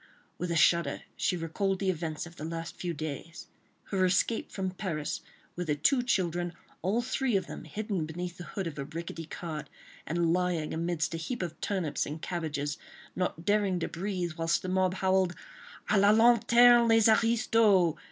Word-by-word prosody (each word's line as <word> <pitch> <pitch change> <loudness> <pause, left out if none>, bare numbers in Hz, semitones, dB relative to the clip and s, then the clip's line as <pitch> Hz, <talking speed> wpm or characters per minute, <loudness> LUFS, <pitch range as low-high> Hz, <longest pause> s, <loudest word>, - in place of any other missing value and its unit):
With 180 - -2
a 170 - 0
shudder, 160 0 +3
she 180 - 0
recalled 190 +4 -1
the 190 0 +1
events 160 -2 -4
of 170 0 -12
the 150 - -8
last 165 +1 -5
few 175 - -3
days, 160 +2 -6 0.5
her 190 -2 +2
escape 185 +5 +1
from 190 -1 -2
Paris 175 -6 -3 0.3
with 175 -1 -4
her 150 - +1
two 250 - +3
children, 175 -7 0 0.3
all 210 +8 +1
three 255 -2 0
of 190 - +1
them - - -8
hidden 205 -7 -3
beneath 175 +2 -6
the 175 - -7
hood 195 - -4
of 155 -3 -5
a 140 - -3
rickety 165 +2 -6
cart, 155 -3 -6 0.4
and 170 0 +1
lying 180 -3 0
amidst 165 0 -1
a - - -2
heap 185 +6 -3
of 170 -2 -6
turnips 185 -7 -1
and 150 +2 -5
cabbages, 155 -4 -3 0.4
not 175 -2 -2
daring 205 -3 +2
to - - -2
breathe, 180 -1 -3
whilst 165 0 +1
the 185 - -3
mob 185 0 +1
howled 190 -2 +2 0.5
"À 205 -2 +3
la 200 - +6
lanterne 235 +2 +6
les 225 -1 +5
aristos!" 220 -5 +4
180 Hz, 180 wpm, -29 LUFS, 165-200 Hz, 0.5 s, la